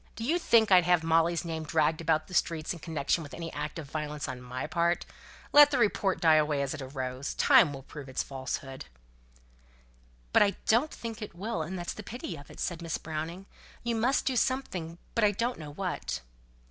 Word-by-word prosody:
Do 225 - -6
you 325 +9 +1
think 225 - +4
I'd 180 -2 +7
have 175 -2 +3
Molly's 165 +1 +2
name 160 -1 -3
dragged 155 +1 +1
about 155 -1 +1
the 185 - -13
streets 165 -2 0
in 170 - -9
connection 160 0 -1
with 145 - -8
any 165 -1 -6
act 150 +2 -4
of 155 -4 -6
violence 150 -1 -3
on 130 -2 -6
my 125 +1 -5
part? 170 +2 0 0.5
Let 290 0 +9
the 280 - 0
report 205 -4 +2
die 160 -2 +5
away 150 -2 +2
as 140 - -2
it 155 - -6
arose. 130 0 -4
Time 220 - +6
will 135 -1 -8
prove 140 -1 -10
its 130 - -1
falsehood." 135 0 -5 1.5
"But - - +6
I 200 -1 +4
don't 240 +8 +3
think 225 -5 -7
it 210 -5 -7
will, 190 -1 -3
and 180 +5 -4
that's 175 -1 -4
the - - -8
pity 215 -3 -6
of 145 -2 -12
it," - - -13
said 175 -1 -3
Miss 165 -1 -2
Browning. 160 +4 -5 0.4
"You 235 0 0
must 245 +5 +1
do 265 - +1
something, 190 -11 -1 0.2
but 230 - +1
I 210 - +6
don't 235 +2 -1
know 150 -2 -7
what." 165 - -3
165 Hz, 210 wpm, -29 LUFS, 150-205 Hz, 1.5 s, Let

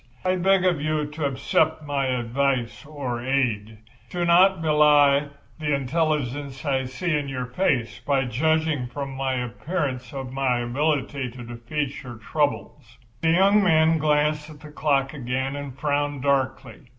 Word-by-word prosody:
I 185 0 +2
beg 185 +1 +3
of 175 -5 +2
you 155 0 0
to 150 +1 -4
accept 155 +3 +1
my 140 -2 -1
advice 125 +2 -1
or 135 -6 -4
aid. 115 -5 -1 0.3
Do 175 -1 -2
not 185 +2 +5
belie 150 -2 +4 0.3
the 150 -2 0
intelligence 140 -1 -2
I 135 -2 0
see 155 +6 -2
in 145 -2 -2
your 130 -2 -3
face 125 -3 -1
by 135 -2 0
judging 155 +1 0
from 140 +2 -5
my 135 0 -1
appearance 125 +1 -3
of 135 -2 -6
my 130 -3 +1
ability 135 +1 -1
to 120 +1 -10
defeat 125 +5 -4
your 125 -2 -9
troubles." 120 -1 -3 0.2
The 160 - +2
young 195 +5 +4
man 160 -2 +4
glanced 150 0 +1
at 150 -2 -13
the 150 - -11
clock 140 -2 0
again 130 0 -3
and 140 -2 -7
frowned 145 -2 -1
darkly. 135 -3 -1
140 Hz, 150 wpm, -24 LUFS, 130-155 Hz, 0.3 s, not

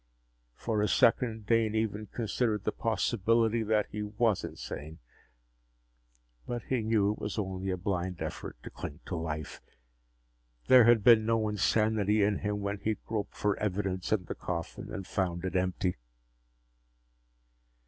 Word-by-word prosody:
For 110 - -1
a 105 - +2
second, 115 -1 +2
Dane 110 0 +2
even 110 -1 -1
considered 110 -1 -1
the - - 0
possibility 115 +1 +1
that 110 -1 +2
he 105 - -4
was 105 0 +1
insane. 80 +2 -7 1.5
But 120 -1 -3
he 130 -3 -1
knew 110 -2 +2
it 105 - -6
was 105 +1 -4
only 95 -2 -3
a 90 - -1
blind 90 -1 -2
effort - - -5
to - - -8
cling 75 +4 -7
to 90 - -4
life. 80 -2 -4 1.0
There 125 -3 +8
had 120 -3 +5
been 115 -1 +7
no 115 -1 +2
insanity 105 0 +2
in 100 0 +1
him 105 0 -2
when 100 0 -2
he'd 110 +2 -3
groped 110 -2 -3
for 105 -1 +1
evidence 95 -3 -2
in 100 -4 +1
the - - -4
coffin 85 -2 -5
and 95 - -5
found 90 -2 -2
it 95 - -3
empty! 90 0 0
105 Hz, 150 wpm, -30 LUFS, 95-110 Hz, 1.5 s, There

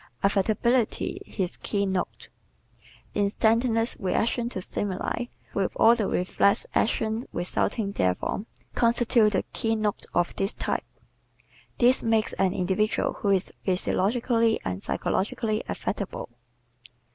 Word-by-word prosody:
Affectability 215 +4 +1
His 185 -2 -3
Keynote 195 -3 -2 0.5
¶ - - -28 0.3
Instantaneous 225 +3 +2
reaction 235 +5 0
to 215 - -4
stimuli 195 +5 -3 0.3
with 195 -2 0
all 230 - +6
the 215 -4 -1
reflex 185 +2 +2
actions 220 +2 0
resulting 200 +4 -1
therefrom 95 - -1 0.3
constitutes 235 -2 +3
the - - +1
keynote 220 -3 -1
of 175 0 +1
this 195 +2 0
type. - - -2 0.9
This 250 +1 +4
makes 225 -1 +1
an 190 - +3
individual 190 +4 0
who 205 - +1
is 195 -1 +1
physiologically 225 +5 +1
and 95 0 -3
psychologically 215 - -1
affectable. 200 -8 -4
215 Hz, 110 wpm, -26 LUFS, 190-230 Hz, 0.9 s, all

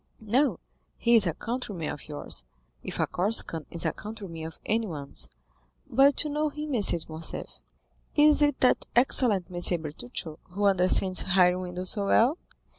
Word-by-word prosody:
"No, 255 +7 +1 0.4
he 235 0 +3
is 210 -5 +6
a 165 - -1
countryman 225 -9 -4
of 145 - -9
yours, 145 - -3 0.4
if - - -6
a - - +3
Corsican 175 -5 +1
is 170 - -2
a - - +1
countryman 200 -7 -8
of 160 - -11
anyone's. 175 -11 -3 0.6
But 275 +4 +4
you 300 - -4
know 300 +1 0
him, 300 0 -5
M. 235 - +1
de 185 - +3
Morcerf." 160 +1 -6 0.6
"Is 300 0 +5
it 290 -2 +2
that 255 - +3
excellent 235 -7 +3
M. 175 0 -1
Bertuccio, 155 +1 -6 0.2
who 205 +1 0
understands 185 -1 +2
hiring 180 -1 +3
windows 180 0 -4
so 200 -2 -1
well?" 250 - +3
200 Hz, 160 wpm, -27 LUFS, 175-245 Hz, 0.6 s, is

